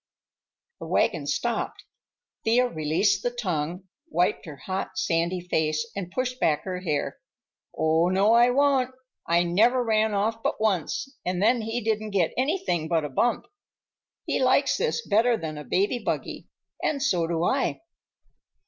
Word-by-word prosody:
The - - -7
wagon - - +1
stopped. - - -2 0.6
Thea 245 +3 +3
released 160 +2 +1
the 245 - 0
tongue, 180 -7 -3 0.3
wiped 180 - 0
her 150 - -7
hot, 185 +8 -5
sandy 170 +2 0
face, 155 -3 0
and 190 -3 -4
pushed 255 +5 -3
back 150 -2 +1
her 185 -1 -4
hair. 155 -6 -2 0.6
"Oh, 160 +2 +3
no, 195 +4 +3
I 240 +1 +6
won't! 260 -1 +2 0.3
I 170 +1 +3
never 225 +9 +3
ran 220 -2 +1
off 220 +3 0
but - - -1
once, 220 - -1
and 180 0 -2
then 230 +4 +3
he 225 +2 -3
didn't 215 0 -1
get 170 -4 +1
anything 265 - 0
but 160 -2 +1
a - - -4
bump. 235 - 0 0.8
He - - -1
likes - - +3
this 470 0 -1
better 230 +3 +3
than 160 -4 -5
a - - -7
baby 200 - 0
buggy, - - -4 0.3
and 280 -3 0
so 180 - +1
do 165 0 -1
I." 265 - 0
200 Hz, 155 wpm, -26 LUFS, 170-240 Hz, 0.8 s, I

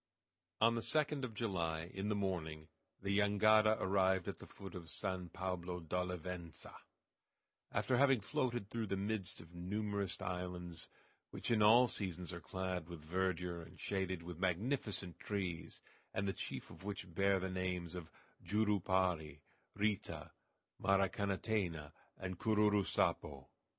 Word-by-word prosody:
On 115 +1 +6
the 115 - 0
2d 150 +1 +1
of 115 -4 -3
July, 85 -6 -1
in 95 +2 -2
the 105 - +2
morning, 80 -6 -2 0.3
the 100 0 +1
jangada 110 +1 +5
arrived 95 -1 +3
at - - -4
the - - -10
foot 95 - -9
of 85 -3 -7
San 95 -3 -2
Pablo 90 0 -3
d'Olivença, 90 0 -4 1.0
after 130 - +2
having 135 -2 +6
floated 120 +1 -1
through 115 0 -2
the 95 - 0
midst 100 -2 -2
of 85 +1 -15
numerous 100 +1 -2
islands 90 -2 -4 0.4
which - - -3
in 110 -2 +4
all 115 +4 +8
seasons 90 -5 -2
are 85 - -6
clad 90 +2 -3
with 80 -3 -8
verdure 90 0 0
and 85 +2 -13
shaded 95 -3 -1
with 85 -1 -7
magnificent 95 0 -1
trees, 95 -5 -3 0.3
and 100 +1 +1
the 95 - +1
chief - - -5
of - - -12
which 100 -3 -5
bear 100 +2 +4
the 95 0 -2
names 90 -2 -2
of 90 -3 -6 0.3
Jurupari, 95 -6 +1 0.3
Rita, 105 -1 -1 0.5
Maracanatena, 95 -5 +1 0.3
and 95 -1 -4
Cururu 105 -2 +4
Sapo. - - 0
95 Hz, 140 wpm, -38 LUFS, 90-105 Hz, 1.0 s, all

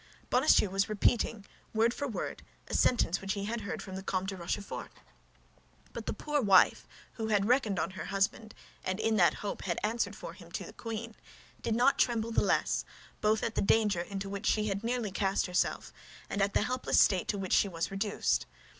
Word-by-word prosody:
Bonacieux 250 -6 +4
was 195 +1 +1
repeating, 215 0 +1 0.3
word 230 +2 +3
for 285 - -3
word, 235 - -4 0.3
a - - -7
sentence 195 -7 +2
which 195 0 -2
he 200 -2 -3
had 230 +2 -3
heard 200 - -5
from 190 - -8
the 190 - -5
Comte 190 0 -2
de 195 - -4
Rochefort; 185 +3 -4 1.0
but - - -7
the - - 0
poor 295 -1 -1
wife, 195 -5 +5 0.3
who 220 -1 -4
had 205 -2 +2
reckoned 235 -6 +2
on 165 - -1
her 190 - -6
husband, 200 +3 -1 0.3
and 185 +2 -2
who, - - -2
in 225 -1 +2
that 175 -3 +5
hope, 205 - -3
had 175 -3 -1
answered 225 +3 0
for - - -8
him - - -14
to - - -3
the - - -10
queen, 230 0 -6 0.5
did 225 - 0
not 250 +4 +3
tremble 230 -2 +1
the - - +3
less, - - +1 0.4
both 215 +1 +2
at 225 - -1
the - - 0
danger 205 -3 +3
into 195 +2 -5
which 200 +2 -4
she 215 -1 +2
had 200 +2 -2
nearly 235 -3 -1
cast 195 0 0
herself 180 -1 -1 0.4
and 200 - -1
at 200 0 +1
the - - +3
helpless 255 +3 +1
state 190 -3 +4
to 205 - -1
which 190 -2 -2
she - - +4
was 170 -2 -3
reduced. 200 +1 0
205 Hz, 205 wpm, -31 LUFS, 195-225 Hz, 1.0 s, wife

